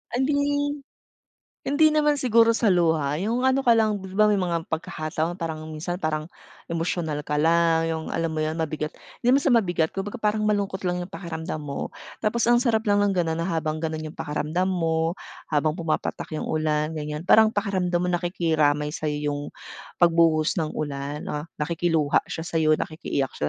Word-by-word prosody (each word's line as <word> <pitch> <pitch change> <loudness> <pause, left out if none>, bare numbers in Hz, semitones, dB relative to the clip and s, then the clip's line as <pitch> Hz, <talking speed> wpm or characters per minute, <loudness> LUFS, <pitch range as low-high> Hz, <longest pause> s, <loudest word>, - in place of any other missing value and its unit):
Hindi. 285 +2 +1 0.9
Hindi 310 +3 +4
naman 300 -2 +2
siguro 230 -2 +5
sa 225 -1 +1
luha, 160 -5 +2
yung 235 +4 0
ano 265 +1 +2
ka 235 - +6
lang, 220 -2 +3
'di 190 -1 -9
ba, 210 +2 +4
may 210 - +3
mga 170 -3 -1
pagkakataon 160 +2 -3
parang 160 -2 -4
minsan 170 +3 -4
parang 155 -3 -2 0.4
emosyonal 165 -3 -2
ka 150 0 0
lang, 165 0 +3
yung 160 -1 -2
alam 165 0 0
mo 155 - 0
yun 155 - -1
mabigat 155 0 -3 0.3
di 245 - +5
naman 275 - +5
sa 285 - +1
mabigat, 180 -10 +2
kumbaga 205 +6 -5
parang 215 0 +1
malungkot 200 -2 -1
lang 180 0 0
yung 175 - -5
pakiramdam 170 -3 -5
mo. 140 -1 -4 0.3
Tapos 225 +2 +1
ang 240 0 +4
sarap 230 -3 +1
lang 205 -1 +3
ng 200 -2 +1
ganun 165 -2 0
na 170 - -2
habang 155 -2 -1
ganun 155 -1 -3
yung 155 - -6
pakiramdam 160 +6 -2
mo 165 -1 0 0.3
habang 155 0 +1
pumapatak 165 -1 -3
yung - - -3
ulan 155 0 0
ganyan. 150 0 -5
Parang 220 +4 +6
pakiramdam 195 -4 -1
mo 180 +1 0
nakikiramay 160 -4 +1
sa'yo 150 -1 -2
yung 145 - -3 0.6
pagbuhos 165 -1 +3
ng 155 - -1
ulan 145 0 -4
na 150 +2 -4
nakikiluha 160 -1 +1
siya 160 - -5
sa'yo 160 -2 +2
nakikiiyak 145 -4 -3
siya, 75 - +1
170 Hz, 175 wpm, -25 LUFS, 155-205 Hz, 0.9 s, ka